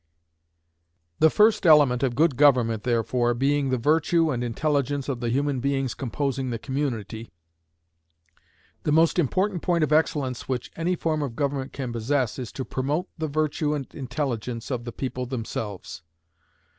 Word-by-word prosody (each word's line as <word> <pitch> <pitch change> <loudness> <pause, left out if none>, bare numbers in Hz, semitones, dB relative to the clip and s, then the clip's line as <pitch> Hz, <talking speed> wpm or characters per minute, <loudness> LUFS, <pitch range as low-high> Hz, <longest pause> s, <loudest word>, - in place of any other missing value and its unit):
The 160 - +6
first 215 +4 +4
element 145 -7 +5
of 130 -3 0
good 155 0 +3
government, 125 -6 +4
therefore, 120 0 +1
being 140 +2 +1
the 130 - +1
virtue 160 +5 +2
and 125 -2 -2
intelligence 140 +2 -1
of 135 -4 -2
the 120 -1 -2
human 140 +2 0
beings 135 -1 -1
composing 135 +1 -2
the 115 - -2
community, 115 -5 -4 1.5
the 150 - -1
most 165 +3 +4
important 185 +4 0
point 170 -3 +1
of 150 - +1
excellence 145 -6 0
which 125 -2 -3
any 175 +2 0
form 160 -2 -1
of 135 -5 -4
government 140 -1 -2
can 130 -3 -5
possess 125 +1 -1
is 125 -3 -5
to 130 - -4
promote 145 +8 -2
the 160 - -1
virtue 150 0 0
and 140 -3 -6
intelligence 125 -4 -4
of 120 -2 -3
the 120 - -5
people 125 0 -4
themselves. 110 -7 -5
135 Hz, 155 wpm, -25 LUFS, 120-150 Hz, 1.5 s, The